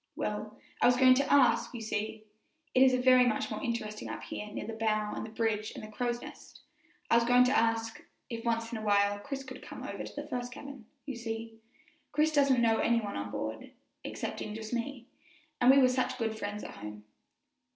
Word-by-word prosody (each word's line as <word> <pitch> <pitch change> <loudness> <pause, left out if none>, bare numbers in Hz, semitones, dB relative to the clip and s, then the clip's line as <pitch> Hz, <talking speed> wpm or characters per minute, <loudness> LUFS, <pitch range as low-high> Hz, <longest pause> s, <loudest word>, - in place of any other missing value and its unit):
"Well, - - -4 0.2
I - - +6
was 245 0 +4
going 255 0 +7
to 275 +2 +1
ask 265 -2 +4
you 235 - -5
see, 220 0 -3 0.5
it 255 - +4
is 260 -1 +6
very 255 0 +6
much 240 -3 0
more - - -4
interesting 230 -4 -3
up - - -6
here 210 - -6
near 210 - -6
the 225 - -5
bow 215 -1 0
and - - -4
the 220 - -6
bridge 220 -1 -1
and - - -7
the 215 - -9
crow's 240 +2 -2
nest - - -12 0.5
I 230 - +7
was 235 - +4
going 245 +1 +6
to 250 - +2
ask, 225 0 +1 0.2
if 230 -1 -6
once 230 -1 -1
in 230 - -3
a - - -7
while 205 -1 +2
Chris 270 +5 -5
could 260 -1 -9
come - - -9
over - - -5
to - - -9
the - - -5
first 245 0 -4
cabin. 275 -5 -10 0.2
You 275 -3 -5
see, 225 -1 -6 0.5
Chris 305 +2 +3
doesn't 275 -5 +4
know 225 -1 +4
any 235 0 +3
one 205 -3 -5
on 100 0 -4
board, 110 +2 -5 0.3
excepting 210 - -5
just 220 +1 -6
me, 245 +1 -3 0.6
and 245 - +6
we're 265 -1 +7
such 255 0 0
good 225 -2 -1
friends 210 -1 -5
at - - -7
home." 105 0 -8
230 Hz, 215 wpm, -31 LUFS, 215-255 Hz, 0.6 s, going